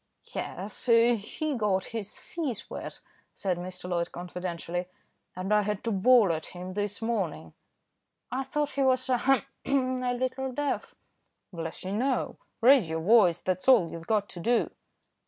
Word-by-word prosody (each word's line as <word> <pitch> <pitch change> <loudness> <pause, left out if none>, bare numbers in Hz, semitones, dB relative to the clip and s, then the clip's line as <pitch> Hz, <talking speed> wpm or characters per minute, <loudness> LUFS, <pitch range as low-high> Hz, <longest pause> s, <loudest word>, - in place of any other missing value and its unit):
"Yes, 195 +6 -5
he 235 +5 +3
got 200 -5 +1
his 215 -2 -5
feet 295 - -4
wet," - - -6 0.3
said 185 -3 -1
Mr. 180 0 -6
Loyd 170 -1 -1
confidentially, 175 0 -4 0.5
"and 185 +3 -1
I 210 - +5
had 210 0 -2
to 230 - -1
bawl 210 -1 +5
at 160 0 -4
him 180 +1 -6
this 205 +2 -3
morning." 185 - -2 0.8
"I 265 +2 -1
thought 295 +2 -1
he 280 - -1
was, 255 -1 +3
ahem! 260 +2 +3 0.2
a 255 -2 +1
little 255 +1 -2
deaf." 290 +2 -2 0.6
"Bless 165 -1 -5
you 190 - -4
no, 250 +5 0 0.2
raise 245 - +6
your 160 0 -2
voice, 180 -3 +5
that's 185 +3 -2
all 230 -11 +6
you've 165 0 -8
got 210 -2 +1
to 175 - -8
do." 235 +7 +1
210 Hz, 155 wpm, -28 LUFS, 180-255 Hz, 0.8 s, raise